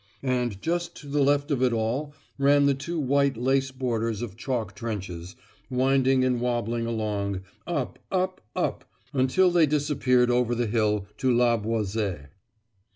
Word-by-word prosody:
And 125 -6 -1
just 170 +1 -1
to 145 - -11
the 145 +1 0
left 145 +2 +2
of 135 -3 +1
it 130 -1 +3
all 125 +7 -2 0.2
ran 140 +1 +5
the 140 - +4
two 160 +5 -4
white 140 -2 +2
lace 135 +2 +1
borders 115 -4 -2
of 105 -5 -6
chalk 115 -4 -3
trenches, 95 -5 -5 0.3
winding 130 0 +3
and 125 -2 +1
wobbling 120 -1 -1
along, 105 -4 -2 0.3
up, 145 -7 -2
up, 185 0 -1
up - - -1 0.3
until 140 +8 +3
they 170 -3 +4
disappeared 135 -4 +2
over 120 -1 +2
the 120 0 0
hill 105 -2 +1
to 130 - +2
La 120 0 +4
Boiselle. 105 -7 -2
125 Hz, 155 wpm, -26 LUFS, 115-140 Hz, 0.3 s, ran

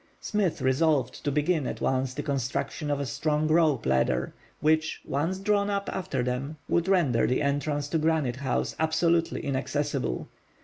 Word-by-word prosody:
Smith 190 -9 -1
resolved 130 0 +1
to 145 - 0
begin 150 0 +1
at - - -4
once 130 -1 0
the 145 - -3
construction 140 +2 -2
of 145 -1 0
a 140 - -1
strong 150 +3 0
rope 155 -6 +3
ladder, 65 0 +1 0.3
which, 160 +1 +1
once 165 +7 -1
drawn 200 +1 +1
up 200 0 -1
after 150 -9 -2
them, 130 +5 -3
would 170 +1 +1
render 165 -12 +3
the 130 +4 +1
entrance 145 +1 0
to 160 +2 0
Granite 155 -6 +1
House 130 -1 -1
absolutely 165 +1 +1
inaccessible. 140 0 -2
150 Hz, 160 wpm, -27 LUFS, 135-165 Hz, 0.3 s, rope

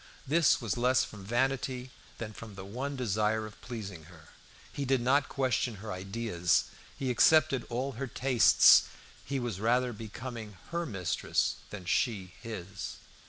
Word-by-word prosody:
This 155 +2 +4
was 115 -7 -2
less 125 +2 +4
from 105 -2 -9
vanity 130 +3 -1 0.3
than 110 -2 -6
from 110 -1 -10
the 95 0 -8
one 130 +8 -4
desire 110 -2 0
of 105 -1 -12
pleasing 100 -9 -7
her. 80 -1 -16 0.4
He 140 - -3
did 135 -1 +2
not 135 +4 +2
question 130 -3 0
her 105 +2 -7
ideas; 95 -2 0 0.3
he 130 -2 -1
accepted 155 0 +4
all 125 +3 -2
her 135 +2 -5
tastes; 125 0 +6 0.4
he 140 -1 -2
was 120 -6 -3
rather 120 +3 +2
becoming 110 -1 -7
her 170 0 -1
mistress 90 - -1
than 100 -4 -8
she 95 -1 0
his. 100 -4 -6
115 Hz, 150 wpm, -30 LUFS, 100-130 Hz, 0.4 s, tastes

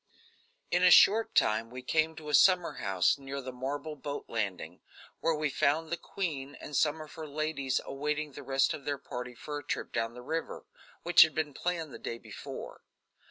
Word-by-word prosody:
In 180 - +3
a 180 - +7
short 220 +5 +6
time 110 +1 +3
we 125 +1 -8
came 160 +4 +1
to 155 -2 -8
a - - -3
summer 180 +3 +5
house 95 +7 +2
near 140 0 -5
the 130 -1 -6
marble 140 +4 -4
boat 145 0 -5
landing, 100 -5 -4 0.4
where 165 0 +1
we 150 -1 -1
found 155 +5 +1
the - - +2
queen 145 -7 -4
and 145 - -8
some 150 +3 +2
of 155 - -10
her 160 -1 -7
ladies 145 -3 -1
awaiting 150 +2 -2
the 140 - -9
rest 135 0 +2
of 140 - -7
their 145 0 -2
party 125 -2 -7
for 145 +4 -5
a - - -12
trip - - -3
down 115 0 -1
the 125 - -9
river, 160 +5 -4 0.4
which 175 0 +7
had 160 - +6
been 155 -2 -1
planned 165 -2 -3
the - - -8
day 115 - -5
before. - - -9
145 Hz, 200 wpm, -30 LUFS, 130-160 Hz, 0.4 s, a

